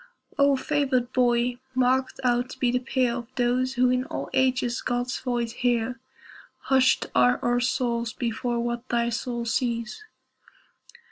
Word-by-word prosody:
O 280 Hz, 0 st, +5 dB
favored 260 Hz, -3 st, 0 dB
boy, 245 Hz, 0 st, +2 dB, 0.2 s
marked 255 Hz, +1 st, +1 dB
out 245 Hz, 0 st, +1 dB
to -, -, -10 dB
be 245 Hz, -2 st, +2 dB
the 250 Hz, -, +1 dB
peer 255 Hz, -1 st, 0 dB
Of 240 Hz, -1 st, -7 dB
those 255 Hz, +1 st, +1 dB
who 250 Hz, 0 st, +3 dB
in 255 Hz, 0 st, +1 dB
all -, -, -5 dB
ages 255 Hz, -2 st, +1 dB
God's 245 Hz, +1 st, -2 dB
voice 240 Hz, -2 st, -2 dB
hear, 245 Hz, +1 st, -1 dB, 0.6 s
Hushed 265 Hz, -1 st, +3 dB
are 125 Hz, 0 st, +4 dB
our 245 Hz, 0 st, +2 dB
souls 240 Hz, -2 st, -1 dB
before 235 Hz, +1 st, -2 dB
what 240 Hz, +1 st, -3 dB
thy 235 Hz, 0 st, +1 dB
soul 240 Hz, 0 st, -3 dB
sees! 235 Hz, -, -2 dB
245 Hz, 145 wpm, -25 LUFS, 240-255 Hz, 0.6 s, O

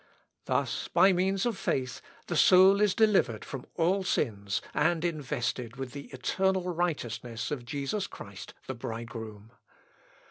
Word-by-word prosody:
Thus, -, -, -1 dB
by 190 Hz, +2 st, +5 dB
means 190 Hz, +3 st, +1 dB
of 230 Hz, -6 st, -1 dB
faith, 130 Hz, -1 st, -1 dB, 0.2 s
the 175 Hz, -, -3 dB
soul 190 Hz, +4 st, +7 dB
is 205 Hz, -2 st, +3 dB
delivered 205 Hz, -, +3 dB
from 135 Hz, -3 st, -7 dB
all 185 Hz, +4 st, +2 dB
sins, 100 Hz, -, -1 dB
and 160 Hz, +3 st, +2 dB
invested 130 Hz, -6 st, -2 dB
with 135 Hz, -1 st, -6 dB
the 140 Hz, +1 st, -8 dB
eternal 185 Hz, +6 st, 0 dB
righteousness 120 Hz, -9 st, -2 dB
of 130 Hz, -5 st, -4 dB
Jesus 145 Hz, -, -2 dB
Christ 100 Hz, -2 st, -10 dB
the 130 Hz, -, -4 dB
bridegroom. 115 Hz, -2 st, -7 dB
145 Hz, 135 wpm, -29 LUFS, 120-185 Hz, 0.2 s, soul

